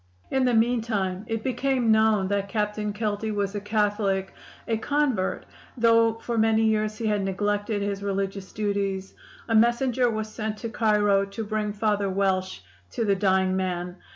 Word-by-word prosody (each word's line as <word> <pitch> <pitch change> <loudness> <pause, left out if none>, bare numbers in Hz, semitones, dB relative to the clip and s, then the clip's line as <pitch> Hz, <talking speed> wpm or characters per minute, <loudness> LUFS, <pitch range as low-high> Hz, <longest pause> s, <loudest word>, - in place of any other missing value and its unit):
"In 265 -1 +2
the 250 - +2
meantime 220 -5 0
it 225 -1 -3
became 260 -2 +1
known 220 -3 +3
that 200 -1 -1
Captain 210 0 -1
Kelty 210 0 -2
was 200 -1 -1
a 205 - -3
Catholic 205 -2 0 0.3
a 225 - +1
convert 265 -6 0 0.3
though 230 -1 +4
for 230 0 -3
many 220 0 +3
years 215 -1 +1
he 230 - -4
had 210 -2 +1
neglected 205 +2 -1
his 200 -1 -3
religious 195 -1 -3
duties. 200 -2 -2 0.3
A 225 - -1
messenger 240 +2 +3
was 220 -1 -2
sent 215 0 -4
to 230 - -5
Cairo 210 -3 +2
to 200 +3 -6
bring 215 0 -2
Father 205 -1 0
Welsh 190 - 0 0.3
to 230 - -1
the 200 - +3
dying 190 -1 +2
man. 180 -1 -2
210 Hz, 160 wpm, -25 LUFS, 195-225 Hz, 0.3 s, though